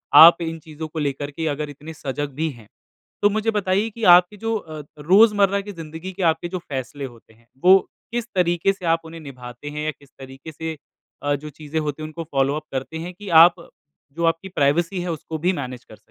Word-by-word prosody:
आप 170 +1 +10
इन 165 0 -3
चीज़ों 155 0 -8
को 155 +1 -6
लेकर 145 0 -2
के 160 +2 -3
अगर 150 0 -2
इतने 150 +3 -10
सजग 145 0 -4
भी 160 +1 -1
हैं, 115 -4 -15 0.5
तो 205 - +5
मुझे 215 +2 0
बताइए 205 +1 +1
कि 225 +1 -10
आपके 180 +4 +2
जो 225 0 -2 0.4
रोज़मर्रा 200 +3 +5
की 205 +1 -8
ज़िंदगी 165 +2 -7
के 190 0 -4
आपके 160 +1 +2
जो 185 - -3
फ़ैसले 135 -2 -5
होते 115 -2 -14
हैं, 115 +1 -27 0.2
वो 190 +1 +8 0.3
किस 240 -1 -2
तरीके 175 +2 +2
से 185 -2 -10
आप 165 0 +3
उन्हें 165 0 -9
निभाते 125 0 -9
हैं, 150 +1 -5
या 155 - 0
किस 140 -1 -21
तरीके 135 +4 -10
से 160 0 -5 0.5
अ, 145 0 +1
जो 150 +2 -7
चीज़ें 150 +2 -5
होती 150 0 -3
हैं, - - -4
उनको 165 +2 -6
फ़ॉलो-अप 140 0 0
करते 135 +4 -4
हैं, 175 +2 -6
कि 200 +1 -10 0.2
आप 175 -1 -1 0.4
जो 170 +1 -4
आपकी 165 +3 0
प्राइवेसी 170 +4 +1
है, 175 -1 -2
उसको 160 0 -5
भी 180 +4 +2
मैनेज 125 -5 -6
कर 110 - -14
सकें। - - -24
160 Hz, 215 wpm, -22 LUFS, 145-180 Hz, 0.5 s, आप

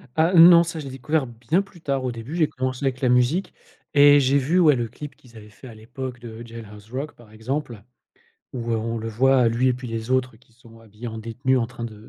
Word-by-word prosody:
Ah, 160 +3 +2
non. 170 0 +8
Ça, 165 -1 -6
je 150 - -7
l'ai 135 - -7
découvert 135 +2 -1
bien 120 +10 -1
plus 190 -4 -15
tard. 140 -3 -2
Au 125 - -2
début 115 +6 -8
j'ai 160 -3 +2
commencé 130 0 -4
avec 130 0 -2
la 130 - +2
musique 125 +10 +1 0.4
et 145 0 +7
j'ai 135 +1 +2
vu, 150 +7 +1
ouais, 155 -5 +5
le 120 -2 -2
clip 135 +5 -10
qu'ils 120 -2 -21
avaient 105 -1 -13
fait 110 +5 -14
à 120 - -11
l'époque 120 +3 -8
de 115 -1 -10
Jailhouse 110 -2 -12
Rock, 140 +4 -5
par 115 -3 -19
exemple, 120 +1 -5 0.7
où, 120 -2 -5
heu, - - +1
on 115 +1 -3
le 110 +1 -5
voit 125 +2 +3
lui 120 +3 +1
et - - +3
puis 125 0 -7
les 115 +1 -5
autres 130 -2 0
qui 115 0 -28
sont, 115 -1 -18
heu, - - -19
habillés 110 +2 -9
en 110 0 -7
détenus 120 +4 -1
en 115 - -1
train 120 0 -8
de 110 -1 -10
125 Hz, 255 wpm, -23 LUFS, 115-140 Hz, 0.7 s, non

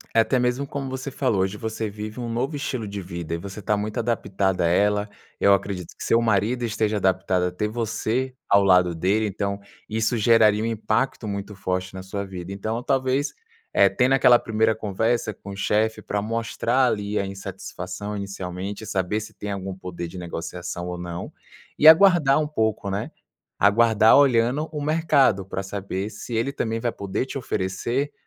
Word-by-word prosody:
é - - +6
até 130 +3 +1
mesmo 125 +3 0
como 135 -1 -5
você 130 +1 -5
falou. 125 -8 0
Hoje 95 +2 -1
você 110 0 -3
vive 105 +3 -7
um 120 - -4
novo 125 +6 -2
estilo 130 -6 -3
de 100 0 -5
vida 85 -3 -6
e - - 0
você 100 +4 -8
tá 105 +2 +1
muito 105 +1 -3
adaptada 95 -5 0
a - - +3
ela. 105 +4 +2 0.3
Eu 100 - +6
acredito 95 -2 -2
que - - -15
seu 115 - +3
marido 115 +2 +1
esteja 110 -1 0
adaptado 95 -2 +1
a - - -3
ter 100 +4 -2
você 115 +3 -2
ao 100 0 +5
lado 90 -2 +4
dele, 100 +6 +1
então 100 0 -3 0.3
isso 110 +2 0
geraria 110 -1 +4
um - - 0
impacto 115 +1 -1
muito 100 +1 -4
forte 95 -1 -3
na 95 - -6
sua 100 +2 -5
vida. 95 -1 -7
Então 110 +4 -3
talvez, 135 +2 0 0.4
eh, - - +6
tendo 130 +1 +2
aquela 125 -2 +6
primeira 110 0 +1
conversa 110 +2 -1
com 100 - -12
o 100 - -6
chefe 110 +2 +1
pra 105 -1 -2
mostrar 115 +3 0
ali 105 -2 -1
a 100 - -1
insatisfação 100 +1 -6
inicialmente 100 +1 -5
e - - -10
saber 95 +1 -1
se 110 - -9
tem 105 - -6
algum 95 -1 -4
poder 90 -2 -6
de 90 - -10
negociação 85 0 -5
ou 90 0 -4
não, 85 0 -6 0.5
e 155 - +9
aguardar 160 -5 +6
um 155 - 0
pouco, 110 -8 -1
né. 100 +1 -3 0.5
Aguardar 110 +2 +5
olhando 135 +2 +3
o 150 -2 -4
mercado, 145 - +2
pra 95 0 -4
saber 100 0 -4
se 120 - -8
ele 115 +5 0
também 115 -4 -2
vai 120 0 -1
poder 100 +5 -3
te 135 - -6
oferecer 120 +5 -2
105 Hz, 185 wpm, -24 LUFS, 95-120 Hz, 0.5 s, e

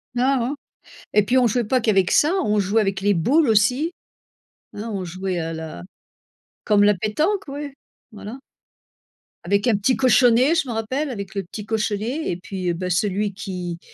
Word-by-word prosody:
Non, 260 +2 +2
non 250 +5 -2 0.6
et 210 - +5
puis 250 +5 +1
on 250 - +4
jouait 240 +2 0
pas 255 +2 +1
qu'avec 195 -5 +2
ça, 305 +4 +4
on 210 0 +1
jouait 205 +3 +2
avec 195 -1 -1
les 205 +1 +3
boules 265 - +2
aussi. 250 +10 +2 0.8
Hein 215 +3 -6
on 190 -2 -3
jouait 185 +1 -3
à 165 0 -3
la 160 - -7 0.8
comme 205 -1 +3
la 210 - +5
pétanque, 310 - -1
oui, 285 0 -6 0.4
voilà. 215 +4 -8 1.1
Avec 200 +5 +1
un 230 - +4
petit 225 +6 +1
cochonnet, 255 +3 +4
je 280 - 0
m'en 235 - -3
rappelle, 260 +7 -2
avec 200 -4 -6
le 195 - -2
petit 200 +4 -8
cochonnet 220 +6 -2
et 175 - -2
puis, 180 -1 -3
bah, 180 +2 -4
celui 200 +3 0
qui 180 -3 -6
210 Hz, 175 wpm, -22 LUFS, 190-255 Hz, 1.1 s, et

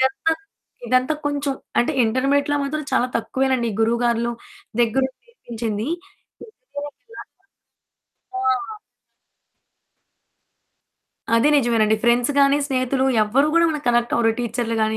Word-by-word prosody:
ఇదంతా 265 +5 +1 0.5
ఇదంతా 255 +5 +2
కొంచెం 285 -1 -1 0.3
అంటే 240 +6 +2
ఇంటర్మీడియేట్‌లో 280 +5 +1
మాత్రం 305 +1 -3
చాలా 245 - +3
తక్కువేనండి 260 0 0
గురువు 230 +1 +2
గార్లు 235 0 +1 0.5
దగ్గరుండి 260 +3 +1
నేర్పించింది. 230 - -5 0.6
ఇంజినీరింగ్‌కెళ్లాక 435 - -11 1.0
మాత్రం 385 - -2
ఆ! 415 +1 -4 2.6
అది 230 +6 +4
నిజమేనండి. 225 -4 +2
ఫ్రెండ్స్ 240 +3 +3
గానీ, 280 +1 +5
స్నేహితులు, 260 -1 0 0.2
ఎవరు 265 +8 +2
కూడా 335 0 +5
మనకి 300 -3 -5
కనెక్ట్ 240 0 +2
అవ్వరు 225 -1 +3
టీచర్లు 230 -1 -2
గానీ, 220 0 -1
255 Hz, 110 wpm, -21 LUFS, 235-285 Hz, 2.6 s, గానీ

